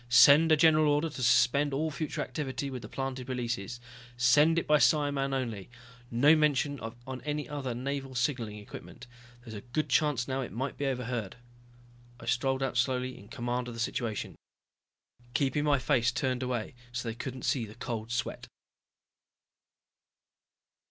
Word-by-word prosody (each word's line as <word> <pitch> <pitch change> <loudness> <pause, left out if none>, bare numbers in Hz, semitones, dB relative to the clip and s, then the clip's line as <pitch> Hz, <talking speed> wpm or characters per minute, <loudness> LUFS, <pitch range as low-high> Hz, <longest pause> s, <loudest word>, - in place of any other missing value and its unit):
"Send 145 +6 +7
a 155 - +6
general 155 -1 +5
order 150 +3 +1
to 130 - -7
suspend 135 +3 +3
all 155 +3 -1
future 155 +1 -3
activity 140 -2 -4
with 130 -2 -5
the 105 - -9
planted 130 -1 -4
releases. 120 -3 -3 0.4
Send 145 +7 +5
it 170 - +1
by 150 0 +4
psimen 145 -3 +2
only, 115 -7 -3 0.4
no 140 +7 +5
mention 145 -2 +1
on 120 +3 -7
any 150 0 -3
other 135 -4 -4
Naval 135 +1 -4
signaling 125 -4 -1
equipment, 105 +3 -10 0.4
there's 115 -3 -9
a 105 - -6
good 130 +7 -3
chance 145 -6 +2
now 135 0 -1
it 125 - -5
might 130 +4 -3
be 140 - -2
'overheard.'" 125 -6 -3 0.8
I 115 - -10
strolled 130 +3 0
out 135 - -2
slowly, 130 0 0
in 100 - -13
command 120 +2 -3
of 120 - -7
the - - -8
situation. 115 -1 -2 1.0
Keeping 140 +2 +1
my 145 -1 +4
face 125 -2 +2
turned 130 -1 -1
away 125 -3 -2 0.2
so 120 0 -4
they 115 - -2
couldn't 130 +2 -6
see 125 -5 +1
the 105 - -12
cold 115 -2 -5
sweat. 120 - -3
130 Hz, 160 wpm, -30 LUFS, 120-145 Hz, 1.0 s, Send